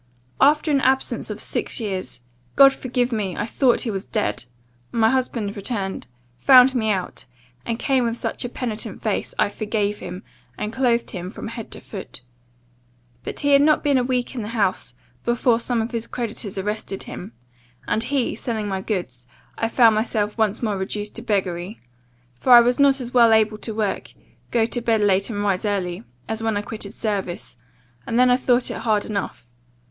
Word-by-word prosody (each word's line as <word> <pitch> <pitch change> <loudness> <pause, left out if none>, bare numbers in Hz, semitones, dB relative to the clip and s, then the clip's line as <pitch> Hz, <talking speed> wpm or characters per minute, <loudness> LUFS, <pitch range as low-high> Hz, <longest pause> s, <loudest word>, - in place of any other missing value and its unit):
"'After 300 +3 +4
an 280 -2 +3
absence 265 0 +1
of - - -5
six - - -1
years 190 - -4 0.3
(God 275 -1 +8
forgive 250 -1 -1
me! 205 -5 -2
I 210 - -1
thought 245 +1 +2
he 230 - -1
was 195 -1 -3
dead) 215 - -2 0.5
my 225 -1 +3
husband 235 -6 -1
returned; 200 -2 -4 0.3
found 260 - +7
me 225 -4 0
out, 190 -4 -2 0.4
and 230 -1 -1
came 260 0 +1
with 230 0 -1
such - - -3
a 245 - -3
penitent 230 -3 -5
face, - - -2
I - - +3
forgave 210 0 -2
him, 180 +2 -7 0.3
and 210 +1 -4
clothed 240 -2 +1
him 180 -2 -5
from 220 - -7
head 230 -1 -7
to - - -7
foot. 190 - -9 1.0
But - - -5
he 285 - +1
had 280 0 +6
not 305 +1 +4
been 285 -3 +3
a - - +1
week 250 0 -1
in 250 - -4
the 210 - -5
house, 200 -3 0 0.3
before 240 0 +2
some 235 -1 -1
of 225 - -5
his 230 -2 -3
creditors 220 -4 -5
arrested 205 0 -3
him; 195 +6 -8 0.5
and, 215 - +1
he 255 +1 0
selling 220 -3 -3
my 190 -1 -2
goods, 130 - -4 0.3
I 225 - -1
found 230 -1 +5
myself 215 -1 -1
once 220 0 0
more 210 -4 -1
reduced 205 +2 -4
to - - -5
beggary; 190 -2 -2 0.5
for 245 - +3
I 240 - +12
was 245 +2 +1
not 275 -1 +4
as 245 0 -6
well 235 -2 +6
able 220 -1 +3
to 220 -1 -5
work, 215 -3 -2 0.4
go 230 -2 +2
to 240 +1 -2
bed 225 -2 +2
late, 195 0 +2
and 205 -2 -2
rise 195 -3 0
early, 185 - -2 0.2
as 220 0 -3
when 225 -2 0
I 205 - -2
quitted 215 -1 -7
service; 195 - -3 0.5
and 230 - -1
then 250 0 +5
I - - +6
thought 250 -1 +1
it - - -4
hard 215 -2 +1
enough. 200 - -4
225 Hz, 190 wpm, -22 LUFS, 205-245 Hz, 1.0 s, I